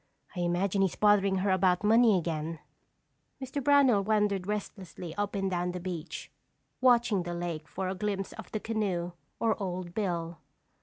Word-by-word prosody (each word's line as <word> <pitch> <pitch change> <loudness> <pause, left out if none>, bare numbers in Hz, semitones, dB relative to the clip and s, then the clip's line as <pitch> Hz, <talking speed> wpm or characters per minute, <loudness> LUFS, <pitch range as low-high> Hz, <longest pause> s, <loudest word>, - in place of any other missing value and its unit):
"I - - -4
imagine 175 +3 +1
he's 190 -2 +1
bothering 205 -2 +4
her 190 +1 +1
about 185 0 +2
money 225 -1 +5
again." 165 -1 -3 0.8
Mr. 270 +1 -4
Brownell 265 -7 +5
wandered 205 -3 +1
restlessly 190 -5 -5
up 205 +2 -2
and 195 -1 0
down 180 0 -1
the 180 - -4
beach, 175 -3 -6 0.5
watching 240 -6 +4
the 175 0 -4
lake 170 -3 -4
for 190 - -4
a 185 - -1
glimpse 195 0 -3
of 220 - -10
the 215 - -2
canoe 200 -6 -2 0.3
or 225 -2 +1
Old 180 -2 -4
Bill. 170 -5 -2
190 Hz, 160 wpm, -29 LUFS, 175-210 Hz, 0.8 s, money